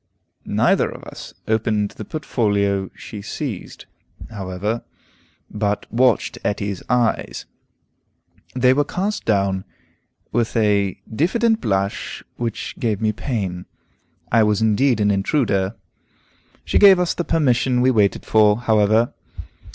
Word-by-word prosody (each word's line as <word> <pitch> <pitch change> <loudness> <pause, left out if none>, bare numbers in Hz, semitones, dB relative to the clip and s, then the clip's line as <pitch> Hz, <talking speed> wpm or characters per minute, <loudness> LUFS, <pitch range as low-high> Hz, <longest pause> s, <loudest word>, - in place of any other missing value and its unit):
Neither - - +2
of - - -10
us - - -10
opened 110 -2 +1
the 110 - -9
portfolio 100 -9 0
she 105 -3 -9
seized, 110 -1 -6 0.5
however, 100 +2 -3 0.7
but 105 -1 -2
watched 125 -1 +2
Etty's 100 -2 -2
eyes. 120 -2 0 1.1
They 125 0 +4
were 145 +2 +2
cast 195 +8 -3
down 100 -3 +1 0.7
with 115 0 0
a 100 -3 +1
diffident 225 - +1
blush 100 -1 -2
which 115 -2 -4
gave 110 -4 0
me 110 -1 +1
pain; 100 -6 -4 0.6
I 115 - +5
was 105 -2 +2
indeed 115 +3 +2
an 105 -1 +3
intruder. 100 -1 0 0.9
She - - +2
gave 195 -2 +8
us 180 -1 +1
the 175 - -2
permission 130 -6 +1
we 130 +1 +4
waited 105 -5 +1
for, 105 -1 +4
however. 110 0 +3
110 Hz, 120 wpm, -21 LUFS, 100-125 Hz, 1.1 s, gave